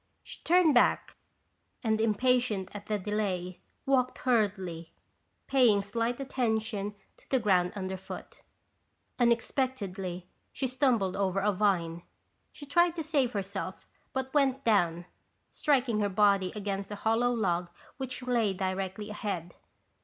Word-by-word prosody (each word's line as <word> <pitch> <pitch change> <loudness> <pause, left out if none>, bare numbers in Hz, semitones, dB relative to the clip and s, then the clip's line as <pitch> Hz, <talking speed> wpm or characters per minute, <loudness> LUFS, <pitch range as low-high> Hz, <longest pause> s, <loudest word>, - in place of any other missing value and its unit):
She - - -10
turned 345 -3 +5
back, 245 - +3 0.7
and 220 -1 +1
impatient 225 -3 +1
at 205 0 -8
the 215 - 0
delay, 190 -3 -2 0.3
walked 255 -2 +2
hurriedly, 190 -9 0 0.5
paying 235 -7 +4
slight 230 +4 -2
attention 220 -6 -1 0.2
to - - -24
the 265 - +3
ground 185 -6 +2
underfoot. 190 -1 -7 0.8
Unexpectedly, 230 -7 0 0.3
she 270 - -3
stumbled 250 -7 +1
over 195 -1 0
a 205 +2 +2
vine. 180 -4 0 0.5
She 290 - -10
tried 345 +4 +3
to 325 - -3
save 280 -6 +1
herself 195 -1 -4 0.3
but 265 0 -3
went 275 -2 +2
down, 175 -6 +2 0.5
striking 260 -7 +1
her 205 -1 +1
body 200 -1 +3
against 200 -1 -3
a 205 - -5
hollow 230 +2 +3
log 180 -7 0 0.3
which 260 -1 -5
lay 235 -5 +1
directly 190 +2 -3
ahead. 180 -5 -4
210 Hz, 125 wpm, -29 LUFS, 190-250 Hz, 0.8 s, turned